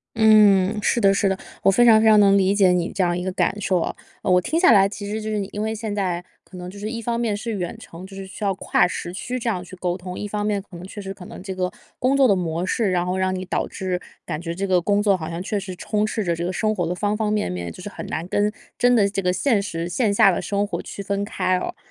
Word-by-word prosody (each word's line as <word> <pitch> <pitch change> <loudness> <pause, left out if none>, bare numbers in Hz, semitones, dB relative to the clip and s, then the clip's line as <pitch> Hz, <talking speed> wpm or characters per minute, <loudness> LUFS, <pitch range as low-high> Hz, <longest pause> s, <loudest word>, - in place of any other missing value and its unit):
嗯， 210 -2 +5
是 235 - +2
的 195 -2 +4
是 195 0 +2
的， 190 - -1 0.3
我 - - +6
非 240 +5 +4
常 220 -2 +7
非 220 - +4
常 215 -1 +7
能 200 -1 +6
理 195 +1 +3
解 190 -3 +5
你 180 -1 0
这 190 -1 0
样 175 0 +1
一 180 - -3
个 185 - -2
感 205 +2 0
受 185 -2 +1
啊。 - - -2 0.3
呃， 185 - +1
我 180 - +5
听 320 - 0
下 360 - +6
来 195 -2 +6
其 205 0 -7
实 215 +1 -3
就 215 - -4
是 215 - -1
你 195 - -2
因 210 - -4
为 220 +1 -1
现 215 -1 -4
在 180 -4 -1 0.2
可 185 - -13
能 180 0 -7
就 200 - -11
是 210 +2 -4
一 230 0 -4
方 235 +1 -2
面 220 -4 0
是 230 +2 -4
远 180 -3 -4
程， 170 +3 -11
就 195 - -12
是 195 - -7
需 195 +3 -9
要 195 -1 +2
跨 180 - +2
时 175 -1 -5
区 245 +6 -4
这 240 - -5
样 185 -6 -1
去 185 - -11
沟 180 -1 -2
通， 180 0 -7
一 205 - -4
方 210 0 -3
面 210 -1 0
可 190 - -15
能 170 - -9
确 205 - -9
实 195 -1 -5
可 180 - -12
能 - - -10
这 190 -1 -5
个 180 -1 -2 0.3
工 265 +2 +2
作 270 -2 +6
的 200 - +4
模 170 -1 -2
式， 210 +1 0
然 180 -1 +1
后 180 +1 -1
让 185 0 0
你 185 0 -4
导 185 - -1
致 185 -2 -3 0.2
感 155 - -4
觉 170 -1 -4
这 195 +2 -2
个 180 -2 +2
工 205 +3 +1
作 200 -2 +4
好 160 -3 -5
像 170 +1 -4
确 205 +1 -2
实 190 -1 -7
充 210 +3 -1
斥 215 0 -1
着 170 -3 0
这 170 - -4
个 180 - -1
生 215 +3 0
活 175 -4 -1
的 180 - -2
方 205 +2 0
方 210 -1 -1
面 210 - 0
面， 85 -2 -4
就 - - -11
是 - - -6
很 - - -8
难 165 +2 -4
跟 205 +2 +1 0.3
真 245 0 +4
的 205 -4 +4
这 200 0 -2
个 180 0 +1
现 210 +2 +1
实 170 -4 -4
线 215 +3 +1
下 200 -1 +5
的 - - -2
生 205 0 -1
活 205 - -4
区 200 - -7
分 200 0 -1
开 185 -3 0
哦。 - - -5
195 Hz, 330 characters per minute, -22 LUFS, 180-210 Hz, 0.3 s, 常